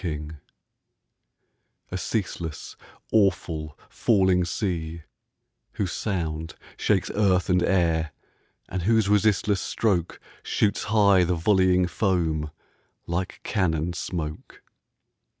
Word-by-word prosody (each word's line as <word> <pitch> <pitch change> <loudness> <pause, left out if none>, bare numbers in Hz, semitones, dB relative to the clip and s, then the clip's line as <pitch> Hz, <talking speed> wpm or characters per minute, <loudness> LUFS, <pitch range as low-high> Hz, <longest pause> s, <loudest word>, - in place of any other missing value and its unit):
NIAGARA 75 -2 -5 1.5
A 95 - -2
ceaseless, 85 -5 -4 0.4
awful, 85 -7 +1
falling 95 -4 +2
sea, 85 -3 -3 0.7
whose 95 -4 -2
sound 80 -6 -3 0.2
Shakes 100 -4 +1
earth 95 -3 +2
and 90 0 +3
air, 85 -4 +1 0.6
and 95 - -3
whose 110 +2 +3
resistless 105 -1 +2
stroke 95 -7 -1 0.2
Shoots 105 -1 0
high 100 -3 +4
the 90 +1 +1
volleying 90 +1 +3
foam 85 -5 0 0.6
like 90 +2 -3
cannon 85 -4 0
smoke! 80 -3 -5
90 Hz, 95 wpm, -25 LUFS, 80-100 Hz, 1.5 s, high